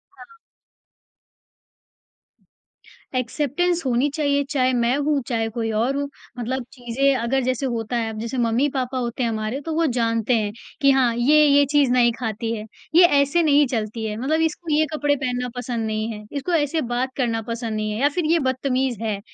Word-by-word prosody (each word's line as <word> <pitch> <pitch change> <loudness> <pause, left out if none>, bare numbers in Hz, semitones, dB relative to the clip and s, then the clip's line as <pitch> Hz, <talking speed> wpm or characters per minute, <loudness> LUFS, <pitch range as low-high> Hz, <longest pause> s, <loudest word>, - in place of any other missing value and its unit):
हाँ। 460 -1 -15 2.8
एक्सेप्टेंस 300 +7 0
होनी 255 +3 +2
चाहिए, 285 -2 +1
चाहें 260 -3 +1
मैं 240 +1 +2
हूँ, 290 -1 +1
चाहें 225 -2 -1
कोई 225 -1 -2
और 235 +6 0
हो। 285 0 -1 0.3
मतलब 255 +2 -3
चीज़ें 265 +2 0
अगर 250 +3 0
जैसे 255 +2 -1
होता 235 -1 -2
है, 225 -1 -1
अब 220 - -7
जैसे 235 +4 -4
मम्मी-पापा 255 +2 0
होते 245 0 -2
हैं 230 - +1
हमारे 220 +4 -3
तो 325 - -2
वो 330 0 +2
जानते 230 0 +1
हैं 210 -1 -1 0.3
कि 275 - +6
हाँ, 260 -3 +3
ये 300 +5 +5
ये 285 0 +5
चीज़ 285 -4 +3
नहीं 245 -1 +4
खाती 225 -1 -3
है। 215 0 -6 0.3
ये 350 - +9 0.2
ऐसे 330 +5 +2
नहीं 295 -1 +5
चलती 220 -2 -3
है 210 -1 -3
मतलब 305 +6 0
इसको 320 0 -2
ये 310 +1 +3
कपड़े 290 -1 +1
पहनना 250 -3 -2
पसंद 245 -2 -3
नहीं 215 +1 -2
है, 210 -1 -8
इसको 290 +5 -3
ऐसे 315 0 +1
बात 255 +2 -1
करना 230 -4 0
पसंद 230 -1 -3
नहीं 215 0 -2
है 210 - -3
या 285 - +4
फिर 335 +3 -2
ये 335 - +4
बदतमीज़ 260 -3 -1
है। 215 -3 -2
255 Hz, 185 wpm, -22 LUFS, 230-285 Hz, 2.8 s, ये